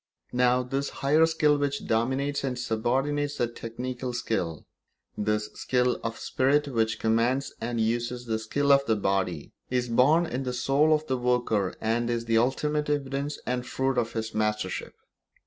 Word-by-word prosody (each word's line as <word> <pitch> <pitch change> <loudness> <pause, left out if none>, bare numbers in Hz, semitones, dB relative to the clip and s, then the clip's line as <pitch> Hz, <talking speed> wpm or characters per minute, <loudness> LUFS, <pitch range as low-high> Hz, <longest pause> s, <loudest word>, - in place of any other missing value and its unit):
Now, 125 0 +3
this 135 +3 -2 0.2
higher 155 +3 +5
skill 150 -2 +2
which 140 0 -1
dominates 130 +6 0
and 130 -2 -2
subordinates 135 +6 -1
the 120 - +2
technical 125 +2 -5
skill, 90 -10 -2 0.5
this 105 0 -1
skill 125 -1 0
of 115 - -2
the - - -13
spirit 145 +3 +2
which 115 -3 0
commands 115 +5 +1
and 120 0 -2
uses 120 +2 -1
the 110 -2 -1
skill 140 +6 +1
of 140 0 +6
the 110 - +3
body, 95 -6 -1 0.2
is 125 -1 0
born 145 +9 +4
in 135 -5 -3
the 125 -2 -3
soul 135 +5 +2
of 155 0 -3
the 130 - -1
worker 120 -6 0
and 115 +2 0
is 115 -1 -1
the 115 -1 +3
ultimate 150 +5 0
evidence 140 0 -2
and 125 0 -2
fruit 130 -1 0
of 115 - -2
his 110 -1 -3
mastership. 105 -3 -2
125 Hz, 165 wpm, -27 LUFS, 115-140 Hz, 0.5 s, of